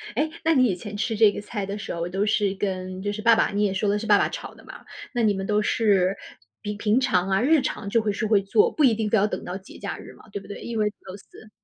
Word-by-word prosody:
诶！ 300 +6 +1
那 325 - +3
你 260 -4 +4
以 200 -7 +1
前 205 +3 -8
吃 220 +2 -1
这 215 -1 +5
个 - - -6
菜 205 -1 -5
的 200 +1 -5
时 200 - -6
候， 170 0 -3
都 195 +3 -1
是 205 -2 +1
跟 185 -1 -4
就 205 +1 -2
是 215 - -5
爸 230 +1 +6
爸， 225 - +2
你 205 +1 0
也 200 -2 +1
说 195 +2 0
的 205 - +2
是 220 - -5
爸 - - +6
爸 - - +2
炒 - - -7
的 - - -17
嘛。 - - -12 0.3
那 240 - 0
你 215 -2 +3
们 195 0 -4
都 210 0 +2
是 200 -3 +2 0.4
比 210 - -4
平 210 +4 +2
常 205 -8 +1
啊， 190 +1 +2
日 295 +3 +4
常 215 -5 -4
就 230 +3 +2
会 215 -1 0
是 215 +2 -2
会 210 -2 +4
做， 420 - +3
不 310 - 0
一 245 -5 +6
定 220 -1 -2
非 220 - +3
要 200 - +3
等 - - -5
到 180 +1 -4
节 190 - -14
假 200 - -5
日 - - -11
嘛， - - -18
对 200 - -5
不 - - -15
对？ 205 - -8
因 235 -1 -5
为 210 -1 +2 0.2
都是 200 +3 -12
205 Hz, 325 characters per minute, -24 LUFS, 195-225 Hz, 0.4 s, 爸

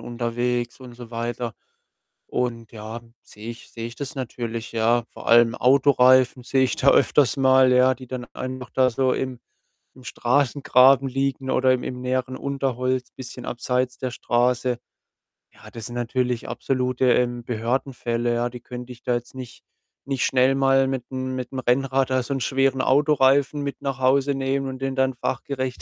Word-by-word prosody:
unterwegs 120 +1 -2
und 125 -2 -11
so 120 -1 -11
weiter. 115 0 -4 0.7
Und 115 -3 -3
ja, 110 +1 -7 0.2
sehe 110 +2 -9
ich 120 - -12
sehe 115 0 -5
ich 120 - -9
das 140 -1 -5
natürlich, 115 -3 -5
ja. 115 +1 +2
Vor - - -8
allem 115 -1 +6
Autoreifen 130 -1 +4
sehe 130 +1 +2
ich 130 - -1
da 140 - +4
öfters 140 +1 +3
mal, 130 -1 +5
ja, 130 +1 +4
die 130 +1 -12
dann 125 -1 -5
einfach 130 -1 -6
da 130 -1 +2
so 130 +2 +1
im 130 -2 -3 0.5
im 130 - -16
Straßengraben 135 +1 +3
liegen 135 0 -2
oder 130 0 +3
im 125 -1 -1
im 125 -1 -5
näheren 130 0 -2
Unterholz, 130 -2 -2
bisschen 125 -1 -9
abseits 125 +1 -1
der 130 -1 -3
Straße. 125 +1 0 0.8
Ja, - - -15
das 115 0 -7
sind 120 - -8
natürlich 125 0 -1
absolute, 125 -1 -1
ähm, 120 -1 0
Behördenfälle, 120 0 -2
ja. 120 +1 0
Die 125 0 -9
könnte 125 +1 -8
ich 120 - -19
da 125 - 0
jetzt 120 +2 -6
nicht 125 -2 -10 0.4
nicht 135 -2 -1
schnell 130 +1 +3
mal 135 0 +3
mit'm 130 -1 -4 0.2
mit 125 -1 -5
'm 130 - -4
Rennrad 130 +1 +1
da 130 - +2
so'n 135 +2 -3
schweren 135 +2 +1
Autoreifen 140 0 +3
mit 140 - -5
nach 135 -1 -3
Hause 135 +2 +2
nehmen 135 0 -1
und 130 -1 -6
den 135 0 -2
dann 130 0 +1
fachgerecht 130 +1 -3
130 Hz, 170 wpm, -23 LUFS, 120-135 Hz, 0.8 s, allem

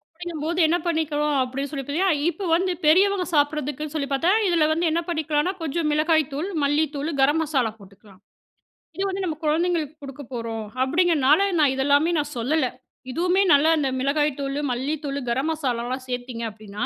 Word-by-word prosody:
அப்படிங்கும்போது, 340 -1 -4
என்ன 340 - +2
பண்ணிக்கிறோம் 300 -3 0
அப்படின்னு 270 +3 -4
சொல்லி 275 -3 -4
பாத்தீங்கன்னா, 335 +5 +1
இப்போ 390 +3 -5
வந்து 370 +2 0
பெரியவங்க 375 +4 +4
சாப்பிடுறதுக்குன்னு 295 0 -1
சொல்லி 285 -3 -1
பாத்தா, 330 +7 +2 0.2
இதில 340 -4 +3
வந்து 330 +2 +1
என்னா 330 +2 0
பண்ணிக்கலானா, 315 0 0
கொஞ்சம் 320 +1 -1
மிளகாய் 315 +1 +3
தூள், 310 +8 -3
மல்லி 290 +2 +2
தூளு, 290 +4 -2
கரம் 290 +4 +3
மசாலா 265 -7 0
போட்டுக்கலாம். 195 -1 -18 0.8
இது 385 - -2
வந்து 385 0 -3
நம்ம 325 -3 -2
குழந்தைங்களுக்கு 315 -1 0
குடுக்க 275 +1 -8
போறோம் 230 -2 -4 0.2
அப்படிங்கிறதுனால, 305 0 +3 0.2
நான் 290 -3 +4
இதெல்லாமே 285 +5 +2
நான் 295 0 -3
சொல்லல, 260 +4 +1 0.4
இதுவுமே 360 +6 +2
நல்லா, 290 +3 +5
அந்த 280 -3 0
மிளகாய்த்தூளு, 280 0 0
மல்லி 265 +5 -1
தூளு, 280 -1 -3
கரம் 265 +6 0
மசாலாலாம் 255 -4 -3
சேர்த்தீங்க 245 -1 -4
அப்டின்னா, 210 +1 -6
295 Hz, 160 wpm, -23 LUFS, 270-325 Hz, 0.8 s, நல்லா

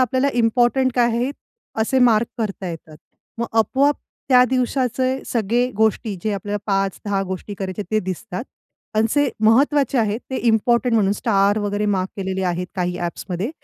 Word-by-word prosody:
आपल्याला 260 +2 +2
इम्पोर्टंट 240 +3 +2
काय 240 -1 +4
आहे, 240 +4 0 0.5
असे 260 +4 +2
मार्क 235 -2 +4
करता 195 -4 -3
येतात. 160 -2 -9 0.4
मग 235 - -1
आपोआप 275 +6 +3 0.3
त्या 250 -1 +7
दिवसाचे 255 0 0
सगळे 235 +2 +1
गोष्टी 220 0 +1
जे 215 - -1
आपल्याला 205 +1 -3
5-10 195 0 -1
गोष्टी 190 +2 -5
करायचे 190 +1 -4
ते 215 - +2
दिसतात. 185 +3 -5 0.5
आणि 220 +1 +3
जे 290 -2 +3 0.2
महत्वाचे 275 +3 +3
आहेत 220 +1 0
ते 260 - -2
इम्पोर्टंट 235 +2 +2
म्हणून 200 -3 +3
स्टार 205 -1 +2
वगैरे 205 0 -1
मार्क 185 +1 -1
केलेले 190 -1 -3
आहेत 180 0 -1
काही 180 -1 -1
ॲप्समध्ये, 175 +5 -4
220 Hz, 155 wpm, -21 LUFS, 195-250 Hz, 0.5 s, त्या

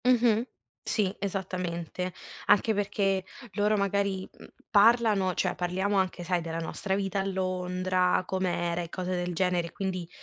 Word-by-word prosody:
Mh-mh, 240 -3 +4 0.4
sì, 205 -3 0
esattamente. 180 -2 -3 0.4
Anche 220 +2 +5
perché 200 -2 0 0.3
loro 210 +1 +2
magari, 200 -1 0
mhmm, - - -15 0.2
parlano, 210 -3 +5
cioè 180 -1 +1
parliamo 190 +3 0
anche 185 -2 0
sai 180 0 0
della 165 0 -4
nostra 190 +4 -2
vita 195 0 -1
a 195 - 0
Londra, 185 -1 0
com'era 175 -2 -1
e 170 - -6
cose 185 +1 -4
del 175 0 -2
genere, 175 -1 +1
quindi 185 -3 -3
190 Hz, 140 wpm, -28 LUFS, 180-200 Hz, 0.4 s, Anche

